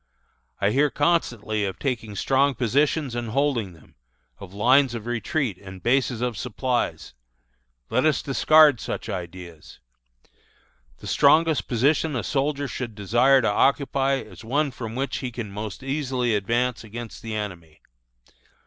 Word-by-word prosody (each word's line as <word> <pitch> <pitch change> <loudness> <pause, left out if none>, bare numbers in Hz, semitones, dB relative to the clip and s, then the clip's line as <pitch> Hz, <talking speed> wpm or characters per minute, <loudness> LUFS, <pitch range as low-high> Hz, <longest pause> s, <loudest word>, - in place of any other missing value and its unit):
"I 100 - +2
hear 145 +5 +3
constantly 120 -9 0
of 95 -2 -3
taking 115 -6 -3
strong 135 +4 +2
positions 140 +3 +1
and 120 -1 -3
holding 120 -6 0
them 80 - -20 0.5
of 95 -2 -10
lines 125 +5 +3
of 115 -2 -6
retreat 120 - -2
and 95 -1 -10
of - - -18
bases 125 -1 +1
of 125 -2 -1
supplies. 125 - -2 0.8
Let 125 +3 +2
us 155 - +1
discard 145 0 +5
such - - -5
ideas. 85 -2 -8 1.2
"The - - -13
strongest 160 +2 +3
position 140 +5 +1
a 120 - -2
soldier 140 0 -1
should 120 -4 -5
desire 120 +6 +3
to - - +2
occupy 135 +3 +2
is 135 - -8
one 140 +5 0
from 115 -2 -7
which 135 +2 -2
he 130 - -4
can 115 -3 -6
most 105 +4 -6
easily 135 -4 -1
advance 115 +5 0
against 115 +1 -8
the 110 -1 -5
enemy. 90 -7 -6
120 Hz, 145 wpm, -24 LUFS, 110-140 Hz, 1.2 s, discard